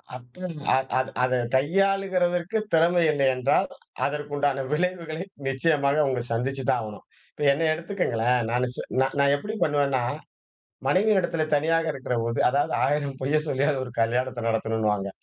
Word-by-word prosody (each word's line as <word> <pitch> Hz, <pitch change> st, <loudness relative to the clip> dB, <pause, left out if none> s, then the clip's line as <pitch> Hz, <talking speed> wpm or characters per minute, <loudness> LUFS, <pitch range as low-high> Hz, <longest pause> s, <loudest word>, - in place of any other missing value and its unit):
அத 125 Hz, +5 st, -13 dB, 0.6 s
அத 130 Hz, 0 st, +1 dB, 0.2 s
அதை 125 Hz, 0 st, +2 dB, 0.2 s
கையாளுகிறதற்கு 185 Hz, +3 st, +1 dB, 0.2 s
திறமை 170 Hz, +2 st, +4 dB
இல்லை 140 Hz, -2 st, +2 dB
என்றால், 125 Hz, +2 st, +2 dB, 0.4 s
அதற்கு 145 Hz, 0 st, -4 dB
உண்டான 140 Hz, -2 st, 0 dB
விளைவுகளை 170 Hz, 0 st, -2 dB, 0.2 s
நிச்சயமாக 140 Hz, +1 st, +2 dB
அவங்க 130 Hz, -3 st, 0 dB
சந்திச்சுதான் 130 Hz, +1 st, 0 dB
ஆவணும். 105 Hz, -2 st, -9 dB, 0.3 s
இப்ப -, -, -6 dB
என்னைய 155 Hz, +3 st, +1 dB
எடுத்துக்கங்களேன். 125 Hz, -, 0 dB
நானு 125 Hz, +1 st, +1 dB
சு -, -, -7 dB, 0.2 s
நான் 135 Hz, 0 st, 0 dB
நான் 140 Hz, 0 st, +4 dB
எப்படி 210 Hz, +9 st, -6 dB
பண்ணுவேன்னா, 140 Hz, -4 st, +1 dB, 0.9 s
மனைவியினிடத்திலே 185 Hz, -2 st, +2 dB
தனியாக 165 Hz, +2 st, +1 dB
இருக்கிறபோது, 115 Hz, -3 st, -2 dB
அதாவது 140 Hz, +2 st, 0 dB
1000 140 Hz, -2 st, -1 dB
பொய்யை 150 Hz, +3 st, +2 dB
சொல்லியாவது 140 Hz, 0 st, 0 dB
ஒரு 125 Hz, -, -9 dB
கல்யாணத்தை 125 Hz, +2 st, -1 dB
நடத்தணுன்னுவாங்க. 110 Hz, -3 st, 0 dB
140 Hz, 130 wpm, -25 LUFS, 125-165 Hz, 0.9 s, திறமை